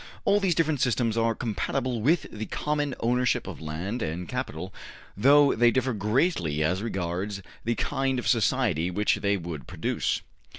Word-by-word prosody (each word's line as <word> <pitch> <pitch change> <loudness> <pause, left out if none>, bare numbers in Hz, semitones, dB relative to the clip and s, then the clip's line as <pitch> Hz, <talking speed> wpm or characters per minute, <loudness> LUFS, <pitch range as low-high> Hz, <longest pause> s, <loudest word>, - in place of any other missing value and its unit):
All 200 +1 +4
these 190 -4 +1
different 155 -4 +1
systems 115 -2 +1
are 115 0 +1
compatible 120 +2 -2
with 155 +7 +3
the 110 0 -5
common 145 -3 -1
ownership 125 +1 +1
of - - -7
land 85 +10 -4
and 85 +1 -3
capital, - - -4 0.4
though 140 +6 +6
they 120 +1 +5
differ 130 +1 +1
greatly 105 - +1
as 90 +5 0
regards 95 -1 -3 0.2
the 120 +1 +1
kind 135 +2 0
of 125 - -3
society 110 - +2
which 105 +4 +1
they 100 0 +1
would 80 -6 -7
produce. - - -1
115 Hz, 160 wpm, -27 LUFS, 95-130 Hz, 0.4 s, though